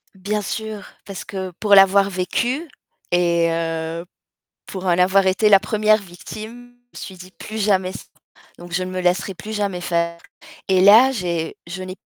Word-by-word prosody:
Bien 205 +3 -3
sûr, 215 0 -5 0.2
parce 195 -2 -7
que 190 -2 -6
pour 205 -2 +4
l'avoir 195 0 +6
vécu 240 - -2 0.4
et 170 -1 +2
heu, 165 0 -3 0.6
pour 190 -1 -7
en 180 - +2
avoir 190 +1 +3
été 200 +3 +3
la 195 -1 +7
1re 215 +1 +2
victime, 220 +6 -10 0.2
je - - -12
me - - -6
suis 190 - -9
dit: 185 +1 -13
«Plus 215 - -8
jamais 190 -3 +1
ç» - - -10 0.5
donc 175 0 -12
je 185 - 0
ne 185 - -6
me 185 - -3
laisserai 180 +2 0
plus 210 +4 -9
jamais 200 -4 -2
faire. 170 -1 -1 0.5
Et 190 -1 +4
là, 220 +7 +7
j'ai 175 -8 -3
je 185 +2 -6
n'ai 185 0 -7
190 Hz, 180 wpm, -20 LUFS, 180-210 Hz, 0.6 s, la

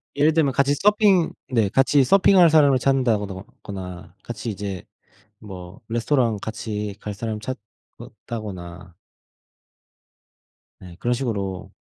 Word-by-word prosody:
예를 150 +3 +3
들면 155 -4 +2
같이 140 +2 +2
서핑 200 -1 +3 0.2
네 115 -5 +2
같이 135 +5 +3
서핑할 185 +3 +5
사람을 145 -4 +5
찾는다 130 -4 +2
더거나 95 -2 -8
같이 120 0 -6
이제 100 -3 -5 0.6
뭐 95 -2 -10
레스토랑 120 -1 +1
같이 105 -2 -5
갈 105 - -5
사람 110 +1 -4
찾는다거나 100 -5 -9 1.8
네 90 -2 -12
그런 120 +4 0
식으로 100 -7 -3
110 Hz, 245 characters per minute, -23 LUFS, 100-135 Hz, 1.8 s, 서핑할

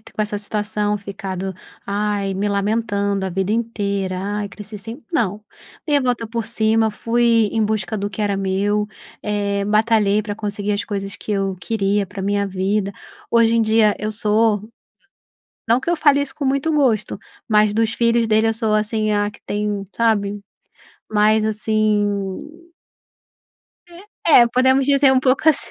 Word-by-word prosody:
com 220 - -8
essa 210 0 -1
situação 210 0 -2
ficado: 195 -2 -5 0.3
"Ai". 200 -1 -1
Me 200 +2 -1
lamentando 200 -1 0
a 190 - -2
vida 190 +3 -1
inteira: 200 -5 -2
"Ai, 205 +2 -3
cresci 210 +1 -10
sem". 225 +5 -8
Não, 210 - 0 0.5
dei 295 -2 +3
volta 245 -3 -1
por 230 0 -3
cima, 220 0 +1
fui 230 0 +2
em 225 -1 +1
busca 215 -2 -2
do 205 0 -3
que 210 - -7
era 205 -1 0
meu, 200 +2 0 0.4
eh, 200 -1 -1
batalhei 215 -1 +2
pra 205 0 -4
conseguir 205 -1 -3
as 205 - -1
coisas 200 -1 -4
que - - -8
eu 195 -1 -1
queria 205 -2 0
pra 190 +1 -9
minha 200 +1 0
vida. 195 +1 -1 0.4
Hoje 230 -1 +4
em 230 - +3
dia 220 -1 +3
eu 215 +1 -3
sou 215 0 +2 1.1
não 230 +2 +4
que 260 - -3
eu - - +3
fale 290 -2 +4
isso 285 - -5
com 285 - -3
muito 275 +4 0
gosto, 250 -8 +1 0.3
mas 210 -1 +3
dos 225 0 +1
filhos 235 0 +2
dele, 220 0 +3
eu 225 - 0
sou, 220 -2 0
assim, 215 0 0
a 205 0 +1
que - - -18
tem 205 -1 -2
sabe, 215 -3 +1 0.8
mais 215 +1 +3
assim 215 - -1 1.2
Eh, 345 +1 -13 0.2
é 250 -7 +7
podemos 260 +2 +3
dizer 275 -1 +4
um 260 - +3
pouco 265 +4 +2
assim, 310 - +4
210 Hz, 165 wpm, -20 LUFS, 200-230 Hz, 1.2 s, é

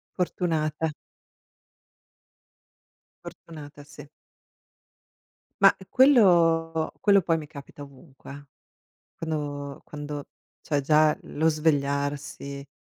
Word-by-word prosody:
Fortunata. 160 -3 -1 2.3
Fortunata, 145 -3 -11
sì. 145 0 -13 1.5
Ma, - - +7
quello 170 - +4
quello 200 -2 +5
poi 165 -1 0
mi 150 -2 -8
capita 145 -1 -12
ovunque, 140 0 -13
eh. 145 +1 -10 0.7
Quando 145 -3 -5
quando 145 -1 -7 0.3
cioè, 145 -2 -1
già 150 +2 +3
lo 160 +2 -1
svegliarsi, 140 -2 -2
150 Hz, 80 wpm, -25 LUFS, 145-165 Hz, 2.3 s, Ma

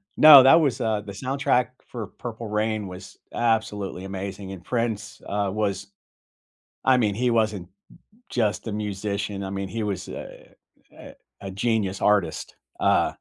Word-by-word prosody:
No, 145 -4 +10
that 160 +5 +7
was, 140 -6 0
uh, 110 -2 0
the 105 -1 -9
soundtrack 130 +1 0 0.2
for 115 -4 -6
Purple 115 -2 -6
Rain 105 -1 -1
was 90 +2 -10 0.2
absolutely 105 -5 -1
amazing, 95 0 -6
and 95 -3 -9
Prince, 115 -3 -3
uh, 100 -1 -1
was 100 -2 -2 1.0
I 130 -1 +4
mean, 105 -4 +1
he 125 +2 +1
wasn't 105 -6 0 0.6
just 110 -2 -1
a 110 - -3
musician, 100 -1 -3
I 95 - -5
mean, 95 -1 -4
he 115 +2 -4
was 100 -3 -3
a - - -10 0.4
a - - -12 0.3
a 95 - -5
genius 100 -2 -1
artist, 95 -7 +1 0.2
uh - - +3
105 Hz, 150 wpm, -24 LUFS, 100-115 Hz, 1.0 s, No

